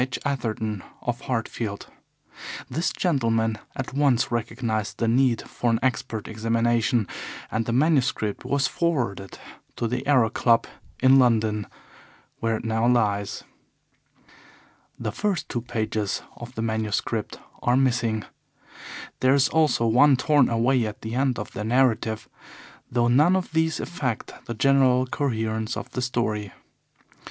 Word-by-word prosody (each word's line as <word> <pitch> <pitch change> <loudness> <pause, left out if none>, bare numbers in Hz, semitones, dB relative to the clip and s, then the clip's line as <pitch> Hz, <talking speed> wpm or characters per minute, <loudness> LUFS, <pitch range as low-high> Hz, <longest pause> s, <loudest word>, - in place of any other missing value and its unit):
H. 125 0 -1
Atherton, 110 -7 -2 0.2
of 120 -1 -2
Hartfield. 115 -4 -3 0.8
This 165 +3 -1
gentleman 115 - 0 0.2
at 130 0 -5
once 135 -4 +2
recognized 115 -2 -2
the 115 - 0
need 120 0 +2
for 120 - -1
an 115 - +3
expert 110 -3 -1
examination, 115 0 +1 0.4
and 110 0 -1
the - - 0
manuscript 130 -6 +1
was 140 -1 +1
forwarded 125 - -1 0.4
to 115 - -1
the 125 +4 -3
Aero 125 -6 +4
Club 115 -1 +3 0.4
in 135 +1 +7
London, 110 -4 +2 0.7
where 115 -1 0
it 115 - -9
now 110 +1 +1
lies. 105 -5 +1 1.5
The - - -3
first 200 -4 -1
two 120 - -3
pages 110 -3 -2
of 120 +1 -10
the 110 - -2
manuscript 110 0 -2 0.2
are 125 +1 +3
missing. 120 -5 +1 0.9
There 130 +1 +4
is 140 0 +3
also 155 -7 +2
one 130 +5 +5
torn 145 -1 +3
away 120 +2 +2
at 105 - -8
the 110 +1 -5
end 130 0 +1
of 105 - -5
the 105 - -5
narrative, 115 -2 +1 0.6
though 120 -1 +2
none 150 +9 +5
of 185 -3 -2
these 160 0 +1
affect 135 -10 -3
the 120 - -4
general 130 0 +4
coherence 110 -4 -2
of - - -7
the 125 - -3
story. 110 -5 -1
120 Hz, 135 wpm, -25 LUFS, 110-130 Hz, 1.5 s, in